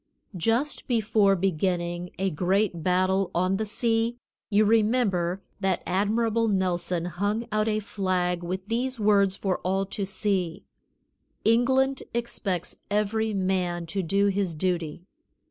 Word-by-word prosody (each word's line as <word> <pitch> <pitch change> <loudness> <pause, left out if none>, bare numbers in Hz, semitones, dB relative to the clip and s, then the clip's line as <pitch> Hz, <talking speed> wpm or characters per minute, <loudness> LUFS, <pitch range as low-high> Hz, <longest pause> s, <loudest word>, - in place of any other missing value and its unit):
Just 230 - 0
before 215 -4 +3
beginning 175 -1 -1
a 190 0 0
great 180 +2 +1
battle 185 +2 +2
on 185 +2 +2
the 215 +1 -2
sea, 230 +2 0 0.3
you 210 0 +4
remember 210 -5 +2 0.2
that 190 -3 0
Admiral 225 +4 +1
Nelson 180 -3 0
hung 205 +6 -1
out 215 +1 +1
a 215 -1 +1
flag 185 -4 -1
with 185 +3 -4
these 245 +2 -1
words 200 -2 +3
for 190 -1 -1
all 195 +1 0
to 200 +1 -4
see: 190 -3 -1 0.8
"England 265 +4 +3
expects 200 -7 -2
every 210 +2 0
man 185 -2 0
to 195 +4 -2
do 195 +4 +1
his 195 -4 0
duty." 170 -1 -2
195 Hz, 130 wpm, -26 LUFS, 180-215 Hz, 0.8 s, you